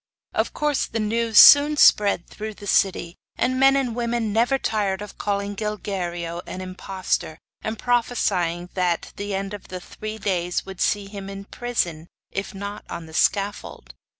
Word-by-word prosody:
Of - - 0
course 295 -2 0
the 225 - -3
news 225 +1 0
soon 295 0 +9
spread 200 -9 +5
through 215 0 -7
the 205 - -11
city, 190 -3 +1 0.2
and 255 +1 0
men 270 0 +6
and 255 -4 0
women 235 -3 -1
never 240 +5 +3
tired 205 -6 -1
of 210 0 -9
calling 200 0 -2
Gilguerillo 180 -5 -4
an - - -6
impostor, 185 -3 -3 0.2
and 220 +1 -4
prophesying 195 -8 0
that 180 -2 -1
the 205 -1 -3
end 195 +1 -3
of 205 - -8
the 185 - -6
three 215 +4 -7
days 180 -4 -1
would 190 -2 -8
see 205 -1 +1
him 195 -1 -8
in 195 0 -8
prison, 180 -10 -3 0.2
if 195 +1 -4
not 200 +1 -6
on 170 - -6
the 160 - -13
scaffold. 195 - -1
200 Hz, 165 wpm, -23 LUFS, 185-225 Hz, 0.2 s, soon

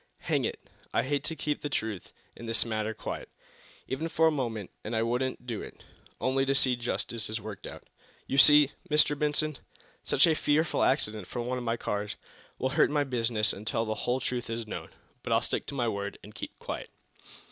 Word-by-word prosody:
Hang - - +1
it, - - -4 0.3
I - - +4
hate 140 +2 0
to 160 - -2
keep 150 0 -2
the 145 - -2
truth 110 - -3 0.2
in 115 - -8
this 115 +1 +2
matter 110 -1 -1
quiet, 110 - -5 0.6
even 160 +5 -2
for 160 0 +3
a 160 - +6
moment, 115 - -2
and 110 +2 -3
I 110 - +2
wouldn't 125 +2 -1
do 115 -4 -3
it, - - -10 0.4
only 135 +1 +2
to 135 - +3
see 130 -2 +4
justice 115 -2 -2
worked 105 -1 -7
out. - - -9 0.4
You 135 - +1
see, 150 +2 +8 0.2
Mr. 150 -1 +4
Benson, 150 0 0 0.4
such - - +5
a 165 - +4
fearful 155 +1 +2
accident, 105 -7 +1
from 120 -1 -3
one 125 +1 -1
of - - -5
my 115 0 0
cars, 105 -2 -2 0.4
will 130 - 0
hurt 135 - +4
my 145 -1 +2
business 115 -5 +1
until 110 +2 -1
the 110 - 0
whole 125 +3 0
truth 125 -2 -2
is 115 0 -3
known. 105 - -6 0.3
But - - -1
I'll - - +4
stick - - -1
to - - -5
my 120 -3 +1
word, 100 -2 -2
and 105 - -11
keep - - -7
quiet." - - -5
120 Hz, 200 wpm, -30 LUFS, 110-140 Hz, 0.6 s, see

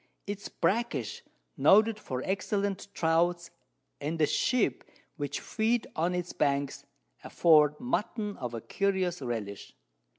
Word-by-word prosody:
It 205 0 -4
is - - -7
brackish, 185 - -1 0.4
noted 215 +9 +5
for 130 -9 -4
excellent 200 0 -1
Trouts, 170 +1 +1 0.5
and 155 +3 -3
the 155 - +4
Sheep 250 - +1 0.3
which 145 -3 -3
feed 225 +1 0
on 170 +3 0
its 175 -1 -3
Banks, 140 -1 0 0.4
afford 150 -3 +4
Mutton 215 -4 -2
of 120 -3 -5
a 115 - -5
curious 190 - -1
Relish. 110 -5 -5
175 Hz, 125 wpm, -29 LUFS, 145-205 Hz, 0.5 s, noted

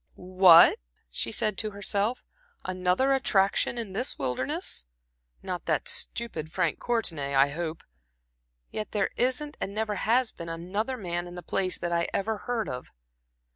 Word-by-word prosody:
"What!" 185 -2 +7 0.3
she - - -2
said 215 -2 0
to 215 - -1
herself 205 +3 -1 0.4
"another 185 +8 +1
attraction 215 -3 +2
in 220 -5 -4
this 245 +7 0
wilderness? 140 - -2 0.6
Not - - -4
that - - 0
stupid 165 -10 -3
Frank 170 -2 0
Courtenay 165 -13 -1
I 135 +1 +5
hope 160 +2 -4
not. - - -33 0.9
Yet 215 - -4
there 205 -2 +1
isn't 260 +4 0
and 200 - -3
never 215 -2 -1
has 240 +4 +2
been 170 0 -8
another 200 +10 -3
man 175 -4 -3
in 175 - -10
the 175 - -8
place 185 +2 0
that 175 - -3
I 170 0 +1
ever 215 +2 -1
heard 230 0 -2
of." 125 0 -6
195 Hz, 155 wpm, -28 LUFS, 170-225 Hz, 0.9 s, What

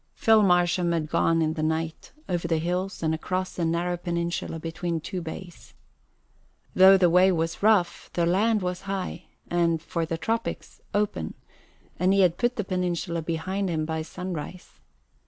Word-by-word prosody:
Phil 220 -1 +5
Marsham 180 -2 +3
had 155 -2 -2
gone 165 -1 +2
in 155 0 0
the 155 - -4
night 160 +1 -2 0.2
over 175 -2 -1
the 165 -1 +1
hills 180 +3 -2
and 160 0 +1
across 185 +3 -2
the 175 - -3
narrow 170 +2 0
peninsula 170 -1 -3
between 165 +1 -3
two 180 +3 -5
bays. 170 +2 -9 1.0
Though 190 +1 +8
the 185 -2 +4
way 180 +2 +5
was 165 -1 -2
rough, 200 -5 +2
the 170 - +1
land 205 +4 +2
was 180 0 -3
high 185 -2 -4 0.2
and 170 -1 +1
for 165 0 -3
the 165 - -2
tropics 225 +8 -3
open, 205 - -1 0.6
and 185 +2 +3
he 195 - +4
had 175 -2 +3
put 240 0 +1
the 210 - -2
peninsula 180 -2 -2
behind 185 +4 -2
him 155 -2 -1
by 160 0 -2
sunrise. 180 +1 -7
175 Hz, 165 wpm, -26 LUFS, 165-185 Hz, 1.0 s, Though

